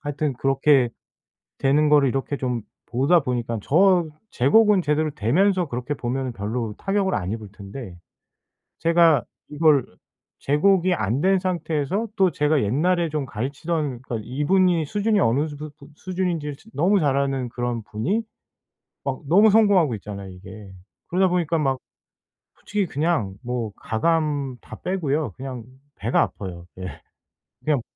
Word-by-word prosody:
하여튼 145 -1 -2
그렇게 135 0 +3 0.7
되는 145 +2 +3
거를 145 -2 +5
이렇게 135 +2 -2
좀 125 -3 -2 0.3
보다 140 +8 +3
보니깐 120 -4 -2
저 175 - +3 0.3
제 125 - +2
곡은 210 +2 +5
제대로 155 0 0
되면서 175 - +2
그렇게 125 +3 -3
보면은 130 0 -3
별로 110 +1 -3
타격을 195 -1 0
안 90 -2 -2
입을 110 -2 -6
텐데 100 -1 -9 0.9
제가 165 -5 +4 0.3
이걸 150 -3 +4 0.5
제 145 +2 0
곡이 185 +1 +3
안 120 - -1
된 190 +2 +3
상태에서 180 +2 -1
또 190 -2 +4
제가 150 -2 +1
옛날에 165 - +1
좀 150 -3 -2
가르치던 140 +3 -3
그러니까 120 -3 -4
이분이 165 +5 +2
수준이 205 +5 +1
어느 135 +7 +2
주두 150 0 -7
또 140 - -14
수준인지를 175 -6 -3
즈 225 - -19
너무 185 +7 +3
잘 140 -4 +2
아는 135 -3 -1
그런 120 -2 -3
분이 175 - -1 0.8
막 135 -2 -3
너무 205 +7 +6
성공하고 200 - +4
있잖아요 100 -1 -8
이게. 95 +2 -11 0.4
그러다 185 +2 +2
보니까 170 -2 0
막 135 -3 0 0.8
솔직히 205 -1 -1
그냥 150 - -1
뭐 120 -3 -3
가감 145 0 -1
다 - - -10
빼고요 160 -5 -1
그냥 130 -3 -6 0.3
배가 115 +4 +1
아파요. 90 -3 -4
예. 95 -5 -7 0.6
그냥 150 -5 +2
145 Hz, 305 characters per minute, -23 LUFS, 125-175 Hz, 0.9 s, 너무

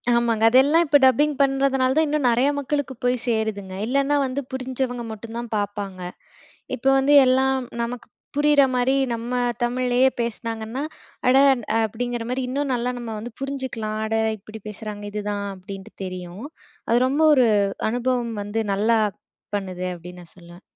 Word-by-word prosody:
ஆமாங்க. 230 -2 +1
அதெல்லாம் 280 +7 +5
இப்ப 290 -1 +5
டப்பிங் 290 +4 +4
பண்றதுனால 270 -1 +2
தான், 315 - +4
இன்னும் 295 -3 +1
நெறையா 245 +4 +3
மக்களுக்கு 285 -1 -2
போய் 250 0 +3
சேருதுங்க. 220 -4 -1
இல்லன்னா 275 +3 +2
வந்து 265 +2 -2
புரிஞ்சவங்க 255 -1 -3
மட்டும் 225 +1 -8
தான் 235 0 -5
பாப்பாங்க. 205 -2 -4 0.8
இப்போ 265 - -1
வந்து 275 +2 +3
எல்லாம் 265 +1 +3 0.3
நமக்கு 235 +1 -5 0.3
புரியிற 295 -1 +5
மாரி 250 +2 +2 0.2
நம்ம 230 +1 -5 0.3
தமிழ்லயே 250 +1 +2
பேசுனாங்கன்னா, 230 +1 -3 0.5
அட! 255 - +5 0.5
அப்படிங்கிற 240 +2 -4
மாரி 255 +1 -1
இன்னும் 275 +1 -1
நல்லா 245 +1 -1
நம்ம 235 -2 -6
வந்து 230 +3 -7
புரிஞ்சுக்கலாம். 260 -6 -3
அட 220 - -2 0.2
இப்படி 215 +2 -11
பேசுகிறாங்க! 210 0 -7
இதுதான் 205 -1 -3
அப்படின்ட்டு 190 +1 -10
தெரியும். 185 +3 -7 0.5
அது 235 - +5
ரொம்ப 285 +4 +1
ஒரு 255 -4 +4 0.4
அனுபவம் 245 -1 -1
வந்து 205 +2 -2
நல்லா 220 +3 +2 0.6
பண்ணுது 185 -2 -4
அப்படின்னு 180 +1 -11
நான் 165 - -18
சொல்லுவேன். 175 0 -14
240 Hz, 145 wpm, -23 LUFS, 215-265 Hz, 0.8 s, அதெல்லாம்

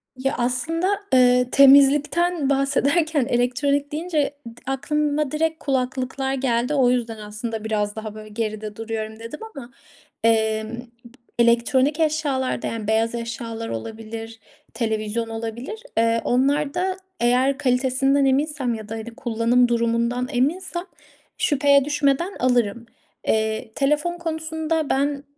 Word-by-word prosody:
Ya, 270 +2 -1
aslında, 255 +9 0 0.3
eee, 250 -1 +5
temizlikten 285 +3 +5
bahsederken 280 +2 +2
elektronik 275 +4 0
deyince 300 -2 -1
d 230 - -9 0.2
aklıma 300 +1 0
direkt 320 +1 0
kulaklıklar 265 0 -1
geldi 250 0 0
o 260 -3 +4
yüzden 235 -3 -1
aslında 210 +1 -5
"Biraz 210 -1 -1
daha, 215 -1 -6
böyle, 215 0 -10
geride 215 -1 -4
duruyorum." 220 0 -5
dedim. 230 +6 -8 0.2
Ama, 255 -2 -9 0.5
emm, 220 0 +1
p 240 0 -5
elektronik 260 +6 +2
eşyalarda, 295 -6 0
yani, 220 -2 -4
beyaz 225 +2 +1
eşyalar 230 -1 -5
olabilir, 225 - -7 0.3
televizyon 225 0 -2
olabilir, 230 - -5 0.2
eee, 230 0 +3
onlarda 290 +8 +1 0.2
eğer 255 +3 +2
kalitesinden 270 +1 +2
eminsem 270 -2 +1
ya 215 -1 -7
da, 225 - -4
hani, 225 +1 -7
kullanım 240 +1 +2
durumundan 235 +1 0
eminsem 345 +8 -1 0.5
şüpheye 280 -1 +3
düşmeden 295 +5 0
alırım. 240 -3 +1 0.4
Eee, 220 0 0
telefon 300 +5 +1
konusunda 320 -1 -2
ben 280 +1 0
250 Hz, 120 wpm, -23 LUFS, 230-285 Hz, 0.5 s, eee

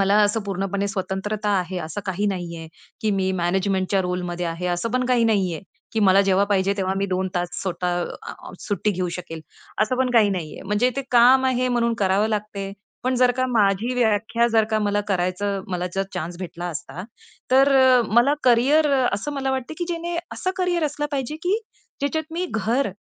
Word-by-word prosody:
मला 195 +1 +3
असं 205 +2 +2
पूर्णपणे 195 +1 -2
स्वतंत्रता 205 +1 -2
आहे 180 +1 -4
असं 160 +6 -5
काही 190 +2 -1
नाहीये, 170 -4 -4 0.3
की 215 - 0
मी 190 -1 0
मॅनेजमेंटच्या 190 +2 +1
रोलमध्ये 180 -1 -3
आहे 165 +2 -3
असं 230 +7 -3
पण 255 +2 0
काही 245 -2 +3
नाहीये 195 -7 +1 0.3
की 225 - 0
मला 195 -1 +5
जेव्हा 195 +1 +3
पाहिजे 195 0 +2
तेव्हा 190 -1 0
मी 200 - 0
2 185 0 -1
तास 175 0 -1
स्वतः 180 -1 -1
अ, - - -7
आ, - - -11
सुट्टी 205 +1 -1
घेऊ 185 -2 -2
शकेल. 165 -2 -7 0.4
असं 220 +4 0
पण 255 -1 +1
काही 220 -4 +5
नाहीये. 175 -5 -5
म्हणजे 210 +6 +1
ते 275 - -1
काम 250 +2 +6
आहे, 255 -1 +1
म्हणून 235 -1 +1
करावं 200 +2 +2
लागते. 205 -2 -3 0.3
पण 255 +1 0
जर 250 0 +4
का 255 0 +1
माझी 215 +1 +2
व्याख्या, 230 0 +2
जर 220 -1 +4
का 220 - +2
मला 205 -1 +1
करायचं, 190 +1 -1
मला 180 -1 -2
जर 195 - +1
चान्स 175 0 -4
भेटला 175 -1 -6
असता. 175 +2 -6 0.5
तर 270 +2 +5
अ, 260 -1 +6
मला 245 +5 +5
करिअर 270 +5 +4
अ, 260 -2 +3
असं 255 +9 -4
मला 270 -1 -2
वाटत, 265 +1 -3
की 345 - -1
ज्याने 340 0 -3 0.2
असं 370 - -2
करिअर 355 -3 0
असलं 295 0 -2
पाहिजे, 275 +1 -2
की 380 +4 +1 0.4
ज्याच्यात 315 +3 -2
मी 355 +2 -2
घर 225 +4 0
205 Hz, 195 wpm, -23 LUFS, 185-255 Hz, 0.5 s, काम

